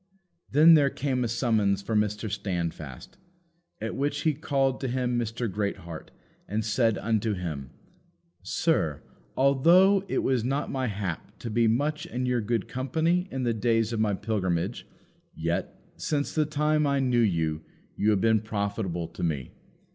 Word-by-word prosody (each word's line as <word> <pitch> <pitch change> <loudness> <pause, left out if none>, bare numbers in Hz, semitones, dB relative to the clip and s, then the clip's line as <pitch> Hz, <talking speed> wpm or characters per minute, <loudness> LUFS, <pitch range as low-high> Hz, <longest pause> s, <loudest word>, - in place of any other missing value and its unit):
Then 155 +4 +7
there 145 -3 +5
came 130 -2 -1
a - - 0
summons 110 -4 +1
for 110 - -2
Mr. 105 +1 0
Standfast. 85 - -4 0.6
At 110 +1 -4
which 140 +2 -1
he 155 - +2
called 135 -2 0
to 135 - -1
him 125 -1 0
Mr. 115 +1 -2
Greatheart, 95 -5 -4 0.4
and 105 +2 -2
said 115 0 +2
unto 110 -1 0
him, 75 -8 -5 0.7
"Sir, - - 0 0.3
although 170 +9 +5
it - - -1
was 130 -4 +1
not 135 +4 -1
my 130 -1 -1
hap 100 -6 -5
to 115 - -6
be 115 +1 +3
much 145 +7 0
in 125 +1 -3
your 125 -1 +1
good 115 -1 -1
company 160 +8 0
in 130 -1 -3
the 120 -1 +1
days 115 0 +1
of 115 - -1
my 105 -2 +2
pilgrimage, 95 -1 -2 0.5
yet, - - -2 0.2
since 145 -2 -1
the 155 -2 +1
time 150 0 +1
I 140 0 +2
knew 125 -3 +2
you, 80 -8 +1 0.3
you 105 - +1
have 105 -3 +2
been 110 -2 +3
profitable 100 -5 -2
to - - -9
me. 75 -7 -2
115 Hz, 160 wpm, -27 LUFS, 100-135 Hz, 0.7 s, Then